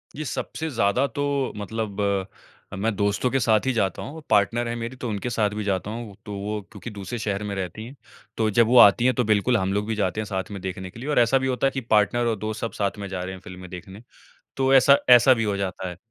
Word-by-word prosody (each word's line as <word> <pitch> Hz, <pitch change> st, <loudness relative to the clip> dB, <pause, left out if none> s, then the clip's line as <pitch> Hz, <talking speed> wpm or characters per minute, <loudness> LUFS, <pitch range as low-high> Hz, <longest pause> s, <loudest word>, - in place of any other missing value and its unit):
ये 155 Hz, -, -5 dB
सबसे 160 Hz, +4 st, -4 dB
ज़्यादा 115 Hz, 0 st, +1 dB
तो 140 Hz, 0 st, -1 dB
मतलब 105 Hz, 0 st, -4 dB, 0.7 s
अ, -, -, -6 dB
मैं 105 Hz, +3 st, -1 dB
दोस्तों 100 Hz, +4 st, 0 dB
के 135 Hz, -, +2 dB
साथ 110 Hz, -2 st, +2 dB
ही 130 Hz, -, +2 dB
जाता 95 Hz, -6 st, -1 dB
हूँ। 160 Hz, +3 st, -8 dB
पार्टनर 115 Hz, +3 st, +2 dB
हैं 120 Hz, -, -3 dB
मेरी 120 Hz, +2 st, -5 dB
तो 125 Hz, -2 st, -5 dB
उनके 105 Hz, +3 st, -3 dB
साथ 110 Hz, -3 st, +1 dB
भी 105 Hz, +1 st, -4 dB
जाता 100 Hz, 0 st, -2 dB
हूँ। 115 Hz, -3 st, -7 dB
तो 105 Hz, -, -6 dB
वो 105 Hz, +2 st, -3 dB
क्योंकि 105 Hz, +1 st, -8 dB
दूसरे 100 Hz, +3 st, -6 dB
शहर 105 Hz, -2 st, -2 dB
में 105 Hz, -1 st, -4 dB
रहती 95 Hz, +4 st, -5 dB
हैं, 130 Hz, -, -11 dB, 0.4 s
तो 110 Hz, -1 st, +2 dB
जब 115 Hz, +2 st, +3 dB
वो 125 Hz, +2 st, +4 dB
आती 110 Hz, +2 st, +7 dB
हैं 130 Hz, -, +4 dB
तो 125 Hz, -, +2 dB
बिल्कुल 110 Hz, +3 st, +2 dB
हम 95 Hz, -1 st, -1 dB
लोग 105 Hz, +1 st, 0 dB
भी 110 Hz, -, -1 dB
जाते 100 Hz, -1 st, -1 dB
हैं -, -, -4 dB
साथ 95 Hz, -1 st, -4 dB
में 100 Hz, -2 st, -6 dB
देखने 95 Hz, 0 st, -5 dB
के 115 Hz, -, -13 dB
लिए 135 Hz, -, -5 dB
और 150 Hz, -, +3 dB
ऐसा 120 Hz, +3 st, +4 dB
भी 130 Hz, 0 st, -1 dB
होता 130 Hz, +1 st, +1 dB
है -, -, 0 dB
कि 135 Hz, -, -3 dB
पार्टनर 115 Hz, +1 st, +2 dB
और 115 Hz, -, +1 dB
दोस्त 110 Hz, +1 st, -4 dB
सब 115 Hz, -, -2 dB
साथ 100 Hz, 0 st, -2 dB
में 100 Hz, -, -5 dB
जा 90 Hz, -1 st, -4 dB
रहे 95 Hz, -, -5 dB
हैं 95 Hz, -, -9 dB
फ़िल्में 90 Hz, 0 st, -10 dB
देखने, 95 Hz, +4 st, -10 dB, 0.5 s
तो 135 Hz, 0 st, +2 dB
ऐसा 140 Hz, +1 st, +7 dB
ऐसा 125 Hz, +1 st, +8 dB
भी 115 Hz, -2 st, -1 dB
हो 105 Hz, -2 st, 0 dB
जाता 95 Hz, -1 st, -3 dB
है। 90 Hz, -, -9 dB
110 Hz, 265 wpm, -24 LUFS, 100-120 Hz, 0.7 s, ऐसा